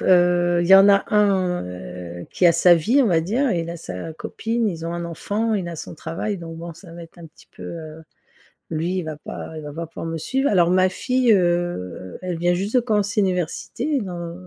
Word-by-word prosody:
heu, 175 -1 +4
il - - -1
y 195 - +9
en 195 +1 +8
a 200 0 +5
un, 190 - +2
heu, 90 -1 -8
qui 180 - +3
a 170 - +6
sa 175 +1 +6
vie 235 - +3
on - - +2
va 165 -4 +3
dire, 235 - 0
il 170 -1 -2
a 170 - -5
sa 155 - -7
copine, 225 +7 -2
ils 165 -3 -5
ont 170 - -3
un 170 0 -4
enfant, 205 +7 -2
il 185 -4 -2
a 170 - -5
son - - -7
travail 165 +6 -4
donc 165 -1 -8
bon 170 +1 -7
ça 165 -1 -14
va 170 0 -9
être 165 - -15
un 170 - -10
petit 160 - -21
peu, - - -9
heu, 160 -1 -8 0.7
lui 165 +4 -1
il 180 - -1
va 155 -1 -5
pas 160 - -8
il 155 - -7
va 145 - -7
pas 165 +2 -4
pouvoir 165 - -7
me 165 0 -3
suivre. 265 - 0
Alors 175 -3 +3
ma 185 0 +4
fille, 250 +4 +1
heu, 175 - -1
elle 180 -2 -3
vient 175 +1 +2
juste 200 +6 -2
de 250 - +7
commencer 210 -2 +1
l'université 195 - -1
dans 175 -3 -5
175 Hz, 230 wpm, -22 LUFS, 165-200 Hz, 0.7 s, y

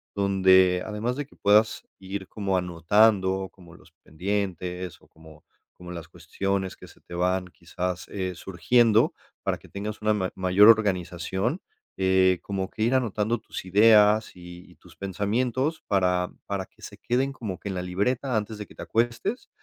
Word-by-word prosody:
donde 95 -2 +4
además, 110 +4 -3
de 145 - -3
que - - -22
puedas 105 +2 +3 0.2
ir 95 0 -6
como 100 -3 -1
anotando, 95 +2 +2
como 85 -3 -17
los 85 -1 -19
pendientes, 90 0 -4
o - - -22
como 80 -1 -17 0.3
como 90 0 -11
las 85 -2 -7
cuestiones 95 +3 -3
que - - -13
se - - -19
te 85 - -10
van 90 +1 0
quizás, 90 0 -5
eh, 95 -2 -3
surgiendo, 110 +6 +2 0.3
para - - -1
que - - -18
tengas 105 +2 -5
una 110 0 +3
ma 95 -3 -2
mayor 95 +3 +5
organización. 95 - +1 0.4
Eh, 95 -1 +3
como 95 -1 -3
que 110 - -4
ir, 120 +4 +2
anotando 115 -2 0
tus - - -8
ideas, 105 +2 +5
y 90 0 -12
y - - -19
tus - - -19
pensamientos, 120 - -1
para 90 -2 +1 0.2
para 100 -2 -3
que - - -27
se - - -9
queden, 130 +3 -1
como 110 -8 -6
que - - -8
en 95 - -4
la 90 - -2
libreta, 115 +7 -1
antes 105 +1 -4
de 105 - -5
que - - -17
te - - -9
acuestes. 115 - -1
95 Hz, 170 wpm, -26 LUFS, 90-110 Hz, 0.4 s, mayor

